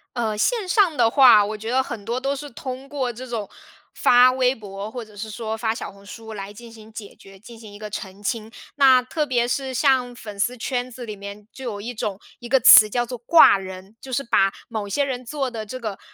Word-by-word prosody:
呃， 220 -3 -2
线 450 - 0
上 365 -4 +3
的 225 - +4
话， 235 -5 +6
我 215 +1 -5
觉 220 +2 -7
得 260 +1 +2
很 230 -5 -7
多 235 +4 -3
都 275 +2 -2
是 290 +1 -8
通 260 +2 -8
过 260 -4 -3
这 255 +3 -9
种 225 -4 -4 0.5
发 250 +1 +5
微 255 0 +1
博， 200 -2 -8
或 240 0 -7
者 210 -1 -18
是 215 +2 -7
说 220 0 -5
发 225 0 -1
小 - - -7
红 200 0 -18
书 220 +1 -10
来 200 -1 -7
进 230 +3 -13
行 220 -1 -15
解 215 -2 -10
决， 195 0 -16
进 225 +3 -14
行 220 -2 -12
一 205 - -12
个 210 0 -8
澄 200 -1 -8
清。 220 +2 -3 0.2
那 265 -3 +6
特 300 +4 -2
别 245 -3 0
是 265 +1 -2
像 255 -1 +2
粉 210 -3 -10
丝 245 +5 0
圈 245 +1 -3
子 245 0 -9
里 215 -2 -7
面 200 +1 -10
就 265 - -10
有 205 -4 -5
一 240 +4 -6
种 210 -4 -4 0.2
一 240 -2 -10
个 265 +1 +4
词 215 -2 +9
叫 240 +3 -1
做 250 +1 -7
挂 280 -2 +6
人， 190 +2 -10
就 265 - -10
是 255 +2 -1
把 195 -5 +2 0.2
某 215 -3 -5
些 285 +9 0
人 260 -2 -4
做 270 +1 -3
的 220 -2 -6
这 255 +5 -7
个 215 -5 -6
235 Hz, 260 characters per minute, -22 LUFS, 210-255 Hz, 0.5 s, 词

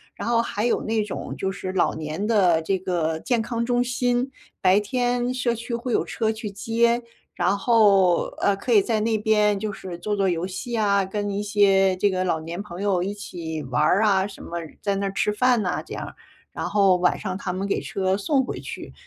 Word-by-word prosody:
然 - - -4
后 235 -1 +3
还 210 -2 -3
有 240 - +1
那 220 -1 0
种， 210 - -6
就 190 - -1
是 190 -1 -5
老 185 - +2
年 155 +5 -4
的 185 -7 +3
这 190 +4 -1
个 165 -3 -1
健 240 +5 0
康 235 +1 -2
中 245 0 +2
心。 245 +1 0 0.3
白 190 +1 +5
天 245 +3 0
社 250 -2 0
区 235 +1 -4
会 240 +1 -4
有 - - +1
车 220 -1 -1
去 220 -1 -5
接， 235 +4 +1 0.3
然 200 - +1
后， 200 -5 +4
呃， 200 - +2
可 220 +5 -4
以 210 -3 +7
在 220 +1 0
那 220 0 +1
边 210 -1 +2
就 210 0 -3
是 180 -3 -7
做 210 +4 -2
做 195 -2 +1
游 175 0 -1
戏 195 +6 -6
啊， 200 -2 +3
跟 205 +2 -3
一 200 +1 -2
些 195 -2 +3
这 200 +2 +2
个 185 -1 -1
老 175 -3 0
年 170 +4 -6
朋 180 -2 -8
友 195 -3 +1
一 200 +2 -2
起 165 -6 -6
玩 130 -2 0
儿 200 +4 +3
啊 195 -3 +3
什 200 -1 -9
么， - - -10 0.3
在 200 -1 0
那 195 0 -1
儿 195 - -5
吃 210 +1 0
饭 245 +1 +3
呐 180 - -2
这 - - -9
样， - - -6 0.4
然 - - -4
后 195 -3 +4
晚 180 0 +1
上 190 -2 -4
他 195 - -4
们 190 +2 -3
给 - - 0
车 190 -1 -1
送 265 +7 +1
回 - - -5
去。 - - -8
205 Hz, 240 characters per minute, -24 LUFS, 185-230 Hz, 0.4 s, 以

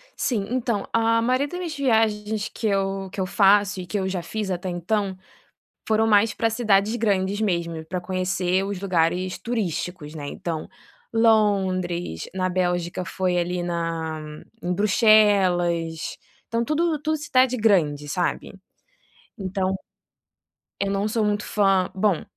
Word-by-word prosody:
Sim, 220 -7 -1
então 235 -5 -1
a 230 0 +3
maioria 255 +4 +1
das 355 - -6
minhas 340 -3 -4
viagens 220 -5 +1
que 225 - -2
eu 195 -1 -1
que - - -7
eu 190 - +1
faço 200 0 +3
e - - -7
que 210 - -2
eu 190 - -1
já 185 -2 -2
fiz 215 +2 -4
até 185 +1 -3
então, 190 +2 -1 0.7
foram 220 0 +3
mais 210 0 +4
para 225 - +1
cidades 220 -2 +2
grandes 200 -3 0
mesmo, 170 -5 -1
para 180 +2 -4
conhecer 185 0 0
os 200 -1 -4
lugares 180 -1 0
turísticos 180 -8 -3
né 145 -2 -6
então, 160 +1 -4 0.5
Londres, 190 - +1
na 185 -1 0
Bélgica 175 -1 -1
foi 180 0 -1
ali 175 0 -1
na 165 -2 -3 0.4
em 180 +1 -1
Bruxelas, 185 -6 +3 0.3
então 230 0 0
tudo 310 +2 0
tudo 310 +1 0
cidade 255 -3 +2
grande, 160 -10 +2
sabe, 175 +5 -2 0.9
então, 190 0 -1 1.1
eu 200 - 0
não 200 +1 0
sou 220 +1 0
muito 210 0 0
fã, 195 -3 +2
bom 190 -3 +1
195 Hz, 140 wpm, -24 LUFS, 180-220 Hz, 1.1 s, mais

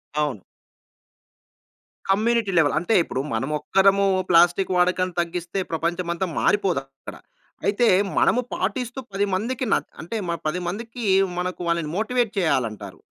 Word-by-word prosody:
అవును. 145 -10 -1 1.7
Community 220 +1 +2
level. 150 -3 +3
అంటే, 195 +6 0
ఇప్పుడు 130 - -3
మనమొక్కరమూ 190 - +2 0.2
ప్లాస్టిక్ 175 +2 +4
వాడకాన్ని 180 0 +1
తగ్గిస్తే 175 +2 -4
ప్రపంచమంతా 170 +2 -1
మారిపోదక్కడ. 140 -10 -1 0.5
అయితే, 210 +4 +2 0.3
మనము 250 - +3
పాటిస్తూ 250 0 -3
10 200 +1 +1
మందికి 240 +7 -1
న - - +6 0.3
అంటే, 200 +8 -5
మ - - +1 0.2
10 165 +4 -1
మందికీ 230 +5 -5 0.3
మనకు 180 0 -3
వాళ్ళని 170 -2 0
మోటివేట్ 235 0 0
చెయ్యాలంటారు. 110 - -1
180 Hz, 115 wpm, -23 LUFS, 165-210 Hz, 1.7 s, న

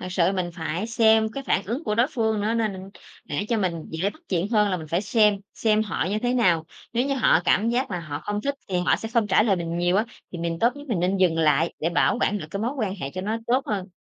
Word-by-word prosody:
Thật - - -6
sự 180 0 +2
mình 180 -2 -2
phải 165 +4 -3
xem 220 -1 +4
cái 275 - -5
phản 195 - +1
ứng 245 - -3
của 210 - 0
đối 235 +3 +3
phương 220 -5 0
nữa 215 +2 0
nên 200 -4 -2 0.3
để 205 - -3
cho 230 - +1
mình 170 -5 -2
dễ 170 +5 -1
bắt 315 - -19
chuyện 180 +1 0
hơn 210 -2 +3
là 185 - 0
mình 160 -3 -7
phải 170 +5 0
xem, 210 0 +4 0.2
xem 215 -1 +2
họ 190 -6 -2
như 210 - 0
thế 245 +2 0
nào. 180 -10 +3 0.3
Nếu 240 +3 +1
như 275 - 0
họ 235 -10 +4
cảm 210 +5 +3
giác 245 +1 0
là 180 -2 -3
họ 150 -3 -6
không 205 0 -2
thích 280 +5 -1
thì 185 -2 0
họ - - +4
sẽ 225 - -6
không 230 -3 +3
trả 205 +1 +4
lời 210 -4 +2
mình 170 -1 -3
nhiều 175 +1 +2
á, 215 - +3 0.3
thì 175 - -5
mình 165 0 -2
tốt 235 +6 +3
nhất 285 0 -11
mình 210 -8 0
nên 185 +2 +1
dừng 180 -4 +2
lại 160 +1 +2
để 165 - 0
bảo 205 - +2
quản 210 - +1
được 155 - -7
cái 200 - -4
mối 240 - -1
quan 205 -5 -1
hệ 140 -9 -5
cho 185 - -3
nó 215 +4 -2
tốt 255 +3 +1
hơn. 195 -3 -3
200 Hz, 285 wpm, -24 LUFS, 175-225 Hz, 0.3 s, xem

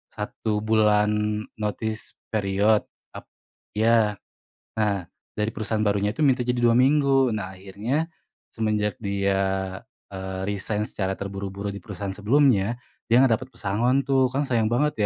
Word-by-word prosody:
1 105 -1 -2
bulan 105 -1 +2 0.2
notice 110 +1 -3 0.2
period. 105 +1 +2 0.3
Tap - - -9 0.5
iya, 110 0 +3 0.6
nah 100 -5 0 0.2
dari 105 0 -1
perusahaan 110 0 -2
barunya 105 0 +1
itu - - -7
minta 130 -4 +3
jadi 125 0 0
2 120 -1 +4
minggu. 135 -1 +4
Nah 95 -3 -4
akhirnya 100 +11 -2 0.5
semenjak 105 0 -1
dia, 95 -2 -1 0.3
eee, 95 0 -5
resain 105 +1 -2
secara 95 -3 -3
terburu-buru 100 0 -5
di 100 - -7
perusahaan 100 -3 -5
sebelumnya, 115 0 +3 0.3
dia 115 - +4
nggak 130 - +3
dapat 130 - -8
pesangon 120 +4 0
tuh, 135 -2 +3
kan 135 +3 -1
sayang 115 -5 +1
banget 145 +6 +2
105 Hz, 135 wpm, -25 LUFS, 100-120 Hz, 0.6 s, 2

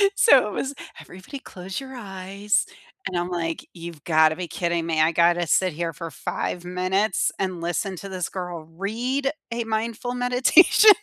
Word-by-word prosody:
So, 275 - +6
it - - -5
was, 275 +6 -2 0.3
"Everybody 190 +10 -10
close 185 -6 -7
your 265 -1 -9
eyes." 200 -1 -1 0.4
And 180 - -3
I'm 175 +1 -1
like, 165 -2 -3
"You've 170 -3 -9
gotta 155 -1 +4
be 180 -1 -5
kidding 170 0 -1
me. 160 -1 +1
I 160 +2 +4
gotta 170 +1 +3
sit 185 0 +2
here 165 +1 -3
for 165 +3 -6
5 175 +4 -4
minutes 185 +2 0
and 185 -3 -2
listen 175 +3 -2
to 195 - -8
this 185 -2 -3
girl 180 -3 -5
read 230 - -2 0.2
a 235 0 -1
mindful 225 +2 -2
meditation?" 250 +12 +6
185 Hz, 170 wpm, -24 LUFS, 170-220 Hz, 0.4 s, So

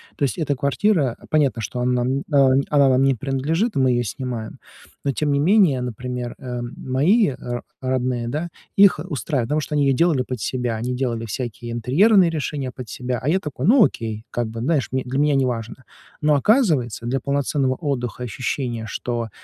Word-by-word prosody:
То - - -3
есть 130 -6 0
эта 145 -4 0
квартира 140 - +1
понятно, 140 -6 +2
что 125 - -4
она, 125 0 +1
м, 130 +2 0
э, 140 -4 +3
она 140 -2 +4
нам 130 +1 +3
не 135 -1 +3
принадлежит, 145 - -1
мы 130 -2 +3
её 120 0 +1
снимаем, 120 -1 -5 0.4
но 140 - +1
тем 145 +2 -1
не 140 - +2
менее, 170 -5 +4
например, 125 0 -5
э, 125 -3 -5
мои 140 - +1
ро 120 0 -5 0.2
родные, 130 -2 -1
да, 155 +8 -3 0.3
их 195 -5 +6
устраивают, 140 - -2
потому 155 +1 +1
что 150 - -4
они 145 - +3
её 135 - +3
делали 165 -3 +3
под 125 -1 -4
себя, 125 0 -2
они 120 +3 -3
делали 120 -3 -2
всякие 120 +1 -5
интерьерные 170 - +4
решения 145 -4 -3
под 125 -1 -9
себя, 125 -1 -3
а 130 - -4
я 185 - +3
такой, 145 -5 -5
ну 235 +4 +6
окей, 110 - -2
как 120 -1 -2
бы, 115 +1 -7
знаешь 140 -2 +1
м 130 - +1
для 130 +2 -2
меня 145 -1 +3
неважно. 125 -1 -2 0.4
Но 150 -1 +3
оказывается, 145 - +2
для 130 +3 0
полноценного 140 0 0
отдыха, 125 - -3
ощущения, 120 0 -3
что 115 +1 -3
130 Hz, 190 wpm, -22 LUFS, 120-150 Hz, 0.4 s, их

